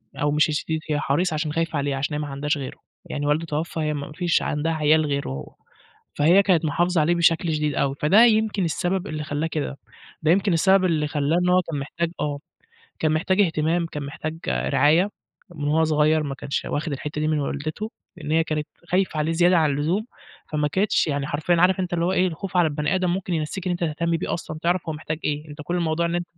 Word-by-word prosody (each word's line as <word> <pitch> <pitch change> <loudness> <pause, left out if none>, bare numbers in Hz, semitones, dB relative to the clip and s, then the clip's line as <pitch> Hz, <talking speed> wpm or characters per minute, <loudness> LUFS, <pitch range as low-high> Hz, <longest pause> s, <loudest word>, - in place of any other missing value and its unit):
أو 145 0 0
مش 150 +2 +3
الشديد، 160 +1 -1
هي 150 - +1
حريصة 160 +4 0
عشان 150 -1 -2
خايفة 165 -1 -1
عليه، 140 -1 -1
عشان 135 +3 -2
هي - - -2
ما 150 - -4
عندهاش 145 +2 -1
غيره. 135 -2 -6 0.3
يعني 145 0 -4
والده 150 +3 +1
توفّى 160 +1 -3
هي 155 -1 0
ما 145 0 -5
فيش 175 -1 +1
عندها 150 +3 -1
عيال 155 0 +3
غيره، 140 - -4 0.6
فهي 170 +7 +5
كانت 175 -5 +2
محافظة 175 +3 +1
عليه 170 +3 +2
بشكل 165 -1 +2
شديد 150 -2 -1
أوي، 135 0 0
فده 200 +10 +6
يمكن 220 -3 +2
السبب 180 +4 -1
اللي 155 -1 -4
خلّاه 150 +1 -2
كده. 150 -3 -3 0.4
ده 155 0 +3
يمكن 195 0 +3
السبب 190 +3 +4
اللي 155 -4 +1
خلّاه 145 +2 0
إن 180 0 +2
هو 180 0 +5
كان 150 -3 -2
محتاج 165 +4 -3
آه. 145 -1 -2 0.6
كان 155 - +1
محتاج 185 +5 +2
اهتمام، 165 -1 +1
كان 150 -3 -6
محتاج 155 +3 -5
رعاية، 145 - +3 0.5
من 145 -2 -3
وهو 160 +2 +3
صغير 155 0 +3
ما 140 -2 -4
كانش 140 - -3
واخِد 155 +2 -2
الحتّة 150 +2 -4
دي 155 - +1
من 155 -1 +1
والدته، 155 +10 -4 0.3
لإن 155 -3 -5
هي 165 +1 +3
كانت 155 -2 -3 0.2
خايفة 185 -3 +1
عليه 155 +2 0
زيادة 175 +2 +4
عن 155 -2 +3
اللزوم، 160 +10 0 0.5
فما 150 -1 +1
كانتش 190 +6 +1
يعني 145 -1 -1
حرفيًا 155 +4 +1
عارف 185 +1 +4
أنت 180 -1 -2
اللي 170 -1 +1
هو 180 - +1
إيه، 185 0 +2
الخوف 180 +2 -4
على 175 -2 +5
البني 150 +4 -1
آدم 185 -1 +1
ممكن 180 0 -2
ينسّيك 165 +4 -3
إن - - +1
أنت 175 - -2
تهتم 165 +1 0
بيه - - -3
أصلًا 155 -2 -5
تعرَف 175 +1 +2
هو - - -2
محتاج 155 0 -5
إيه؟ 150 +1 -2
أنت 145 +1 -11
كل 175 +3 -2
الموضوع 170 -1 0
إن 170 0 -1
أن 175 - -1
155 Hz, 225 wpm, -23 LUFS, 150-175 Hz, 0.6 s, فده